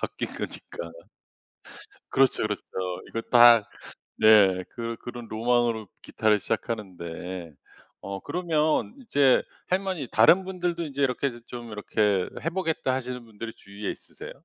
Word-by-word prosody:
바뀐 - - -3
거니까. 85 -1 -6 1.2
그렇죠, 135 -4 +3
그렇죠. 105 -1 -2 0.5
이거 115 - -3
다 120 -3 +8 0.5
네. 105 -4 +6
그 115 0 -4
그런 120 -1 -7
로망으로 115 -1 +1
기타를 110 -1 +2
시작하는데 90 -6 -5 0.5
어 100 0 -5
그러면 160 - 0
이제 140 - +3 0.3
할머니 185 -6 -1
다른 170 +12 +6
분들도 180 -2 -2
인제 140 -2 -3
이렇게 135 +1 +1
해서 120 -2 -10
좀 120 -2 -8
이렇게 105 -2 +1 0.2
해 165 - +1
보겠다 165 -7 -1
하시는 125 -1 -4
분들이 115 0 -8
주위에 100 0 -6
있으세요? - - -9
120 Hz, 300 characters per minute, -26 LUFS, 105-140 Hz, 1.2 s, 다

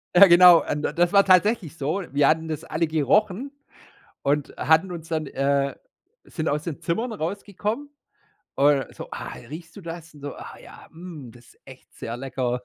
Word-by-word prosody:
Ja 200 +2 +10
genau, 175 -1 +8
äh, - - -3
n 150 - -3
das 175 +3 +1
war 200 -1 +5
tatsächlich 185 -2 +3
so. 160 +7 -2
Wir 140 0 +3
hatten 160 +1 +1
das 155 -2 -5
alle 165 +2 -1
gerochen 195 - +1 0.7
und 145 0 0
hatten 160 +4 +2
uns 165 -2 -8
dann, 155 -2 -2
äh 140 0 0 0.5
sind 160 -2 -3
aus 150 +1 -1
den 165 -5 -5
Zimmern 225 +8 -2
rausgekommen 205 - -4 0.7
und 140 -2 +2
so: - - -9
„Ah, - - -7 0.2
riechst 160 +2 -10
du - - -8
das?“ 165 -2 -9
Und 145 - -15
so: 145 -1 -6
„Ah - - -10
ja, - - -14
mm, 160 -7 -10
das 120 -1 -18
ist - - -35
echt 130 -1 -15
sehr 115 - -6
lecker. 125 -1 -3
160 Hz, 185 wpm, -24 LUFS, 145-180 Hz, 0.7 s, Ja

